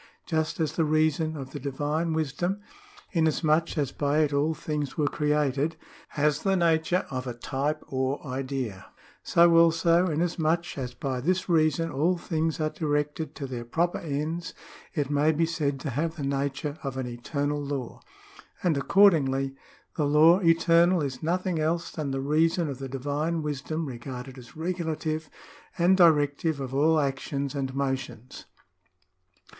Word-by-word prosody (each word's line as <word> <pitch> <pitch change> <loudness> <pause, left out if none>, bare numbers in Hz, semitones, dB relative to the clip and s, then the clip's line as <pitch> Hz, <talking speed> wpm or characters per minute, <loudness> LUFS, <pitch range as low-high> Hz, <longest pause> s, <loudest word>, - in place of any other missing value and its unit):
^ - - -23
" - - -37
Just 160 -1 -1
as 155 -2 0
the 165 - +1
reason 155 0 +1
of 135 -2 -7
the - - -6
divine 145 +4 -1
wisdom, 160 +5 -1 0.5
inas 160 -2 +1
much 160 +2 +2
as 140 -3 0
by 145 +2 +1
it 150 -2 +1
all 150 +3 +1
things 150 -3 -4
were 150 - +2
created, 150 +1 0 0.4
has 150 0 +2
the 195 -1 +2
nature 170 0 +2
of 130 0 -4
a 120 - -4
type 140 +5 -2
or 130 +1 -1
idea; 130 -7 -4 0.3
so 170 0 +5
also, 170 +1 +4
inasmuch 165 +1 0
as 125 -3 -5
by 130 -2 -3
this 185 +6 0
reason 165 -1 +2
all 165 +7 +1
things 160 -2 -2
are 155 -1 0
directed 150 0 -2
to 140 - -5
their 125 -3 -5
proper 170 +9 0
ends, 160 +3 -3 0.4
it 145 -3 -1
may 145 +2 +3
be 160 +2 +1
said 150 -4 -1
to 140 - -3
have 160 +6 -1
the 150 - -5
nature 140 +2 -2
of 135 -2 -4
an 130 - -2
eternal 145 +4 -2
law.... 140 -4 -5 0.6
And 175 -4 +2
accordingly 135 -5 +3 0.4
the 150 -3 +1
law 155 +5 +6
eternal 170 0 +4
is 130 -3 -4
nothing 175 +1 -1
else 165 +2 -1
than 150 -3 -4
the 135 0 -2
reason 160 +3 +2
of 135 -2 -6
the 135 -1 -5
divine 145 +5 -2
wisdom 150 +2 -3
regarded 130 0 -7
as 125 +6 -14
regulative 160 -2 -3 0.5
and 175 +2 +4
directive 155 -3 +3
of 135 -1 -5
all 155 +3 +3
actions 140 0 -2
and 135 -2 -3
motions." 135 -3 -4
150 Hz, 160 wpm, -27 LUFS, 140-165 Hz, 0.6 s, law